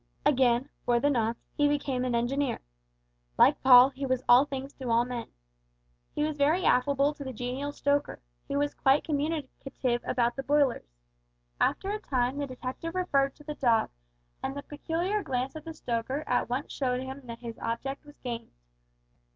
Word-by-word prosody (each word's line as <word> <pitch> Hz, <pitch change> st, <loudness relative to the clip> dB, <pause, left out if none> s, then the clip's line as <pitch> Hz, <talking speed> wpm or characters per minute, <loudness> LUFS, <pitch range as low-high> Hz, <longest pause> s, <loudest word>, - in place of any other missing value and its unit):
Again, 255 Hz, -2 st, +3 dB, 0.2 s
for 240 Hz, -1 st, +2 dB
the 290 Hz, +3 st, +2 dB
nonce, 230 Hz, -2 st, 0 dB, 0.2 s
he 290 Hz, -, +3 dB
became 280 Hz, -3 st, 0 dB
an 250 Hz, -2 st, 0 dB
engineer. 265 Hz, +4 st, 0 dB, 0.8 s
Like -, -, +5 dB
Paul, 255 Hz, 0 st, +9 dB
he 275 Hz, +1 st, -8 dB
was 255 Hz, -1 st, 0 dB
all 250 Hz, +3 st, +7 dB
things 275 Hz, -1 st, -6 dB
to 260 Hz, -3 st, -5 dB
all 230 Hz, +1 st, +3 dB
men. 245 Hz, -2 st, -5 dB, 0.9 s
He 295 Hz, -, 0 dB
was 305 Hz, -1 st, -1 dB
very 315 Hz, +6 st, +3 dB
affable 280 Hz, +3 st, +3 dB
to 295 Hz, -1 st, -8 dB
the 265 Hz, -, -5 dB
genial 255 Hz, +4 st, -4 dB
stoker, 285 Hz, 0 st, 0 dB, 0.3 s
who 280 Hz, -, -1 dB
was 290 Hz, 0 st, 0 dB
quite 270 Hz, +1 st, +3 dB
communicative 280 Hz, -5 st, -2 dB
about 240 Hz, -1 st, 0 dB
the 270 Hz, -, -3 dB
boilers. 275 Hz, -, +1 dB, 0.7 s
After 390 Hz, -, +1 dB
a 425 Hz, -, -2 dB
time 255 Hz, -4 st, -1 dB
the 285 Hz, -, -2 dB
detective 260 Hz, +6 st, -6 dB
referred 275 Hz, -7 st, +1 dB
to 295 Hz, -, -16 dB
the 300 Hz, 0 st, -5 dB
dog, 235 Hz, -6 st, +2 dB, 0.5 s
and 270 Hz, -, -3 dB
the 285 Hz, -, -5 dB
peculiar 340 Hz, +7 st, -2 dB
glance 255 Hz, -2 st, -2 dB
of 310 Hz, 0 st, -8 dB
the 325 Hz, -, -6 dB
stoker 250 Hz, +3 st, -2 dB
at 245 Hz, -, 0 dB
once 255 Hz, +4 st, -3 dB
showed 250 Hz, -2 st, -1 dB
him 265 Hz, 0 st, -8 dB
that 230 Hz, 0 st, -6 dB
his 230 Hz, -2 st, -7 dB
object 245 Hz, +4 st, -3 dB
was 295 Hz, 0 st, -16 dB
gained. 235 Hz, -2 st, -6 dB
270 Hz, 175 wpm, -29 LUFS, 250-290 Hz, 0.9 s, Paul